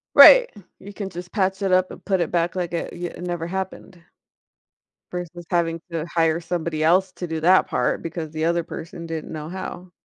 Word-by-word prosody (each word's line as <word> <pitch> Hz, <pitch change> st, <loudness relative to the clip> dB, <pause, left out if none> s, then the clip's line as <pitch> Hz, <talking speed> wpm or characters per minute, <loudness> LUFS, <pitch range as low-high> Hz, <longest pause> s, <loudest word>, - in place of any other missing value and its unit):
Right. -, -, +10 dB, 0.3 s
You 200 Hz, +1 st, -11 dB
can 200 Hz, -1 st, -5 dB
just 175 Hz, 0 st, -8 dB
patch 190 Hz, -1 st, 0 dB
it 195 Hz, -2 st, 0 dB
up 185 Hz, 0 st, +3 dB
and -, -, -11 dB
put 190 Hz, -3 st, +1 dB
it 165 Hz, -, -1 dB
back 170 Hz, 0 st, 0 dB
like 175 Hz, -2 st, -3 dB
it 170 Hz, -, -3 dB
y 175 Hz, 0 st, -4 dB
it 175 Hz, -, -10 dB
never 175 Hz, -2 st, -3 dB
happened 190 Hz, -1 st, -5 dB, 1.1 s
versus 175 Hz, -1 st, -6 dB
having 165 Hz, -1 st, 0 dB
to 165 Hz, -1 st, -2 dB
hire 165 Hz, -1 st, +1 dB
somebody 165 Hz, -2 st, -2 dB
else 185 Hz, +4 st, +3 dB
to 175 Hz, -, -5 dB
do 160 Hz, -1 st, -3 dB
that 185 Hz, +3 st, +5 dB
part 125 Hz, -, 0 dB
because 165 Hz, -2 st, -5 dB
the 155 Hz, 0 st, -2 dB
other 170 Hz, 0 st, +1 dB
person 170 Hz, +1 st, -8 dB
didn't 165 Hz, -2 st, -5 dB
know 155 Hz, -1 st, -6 dB
how. 185 Hz, 0 st, -7 dB
175 Hz, 205 wpm, -23 LUFS, 165-185 Hz, 1.1 s, Right